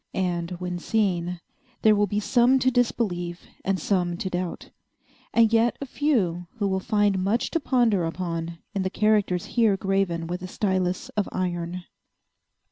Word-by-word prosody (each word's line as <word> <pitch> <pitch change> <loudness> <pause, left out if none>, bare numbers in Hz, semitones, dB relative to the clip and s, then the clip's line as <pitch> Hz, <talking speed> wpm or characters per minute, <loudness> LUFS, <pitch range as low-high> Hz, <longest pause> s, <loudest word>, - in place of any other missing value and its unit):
And, 175 -2 -1
when 180 -1 -3
seen, 180 -4 0 0.4
there 215 -1 +6
will 205 0 +2
be 205 +2 -1
some 245 +4 +4
to 260 0 +2
disbelieve, 180 -8 0 0.2
and 190 -1 0
some 175 -1 0
to 190 0 -4
doubt, 180 -1 -4 0.6
and 230 -1 +4
yet 230 +1 +3
a 280 - -4
few 205 - 0
who 205 -3 0
will 190 -1 0
find 205 -2 +1
much 210 +5 0
to 330 - +1
ponder 240 - +2
upon 165 -1 -4 0.2
in 195 - -1
the 190 - 0
characters 205 -4 +1
here 225 -5 +3
graven 190 -4 0
with 180 +2 -4
a 185 - -5
stylus 185 -2 -1
of 210 -2 -2
iron. 175 -1 -3
190 Hz, 160 wpm, -25 LUFS, 175-215 Hz, 0.6 s, there